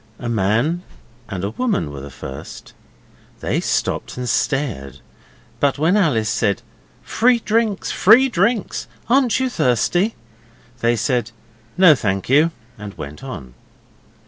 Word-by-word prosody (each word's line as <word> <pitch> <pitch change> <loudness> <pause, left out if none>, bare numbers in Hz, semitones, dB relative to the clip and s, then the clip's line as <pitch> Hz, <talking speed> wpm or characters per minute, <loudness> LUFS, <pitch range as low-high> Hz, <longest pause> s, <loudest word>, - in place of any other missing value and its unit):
A 120 - -6
man 115 - +1 0.5
and 95 +2 -4
woman 225 - 0
were 70 - -7
the 70 - -8
first: 65 +1 -9 0.7
they - - -1
stopped - - -2
and 125 0 -4
stared, 115 - -1 0.6
but 140 -1 +2
when 160 +6 +2
Alice 145 - +2
said, 105 -2 0 0.4
'Free 245 +1 +3
drinks! 220 -2 0
Free 230 +7 +6
drinks! 210 -1 0 0.2
Aren't 255 -1 +3
you 260 - +1
thirsty?' 175 - +1 0.6
they 115 +1 +2
said, 120 0 0 0.5
'No 180 -4 +8
thank 100 -7 -2
you,' 150 +5 +5 0.3
and 105 -1 -8
went 75 +1 -8
on. 65 -2 -8
135 Hz, 125 wpm, -20 LUFS, -, 0.7 s, No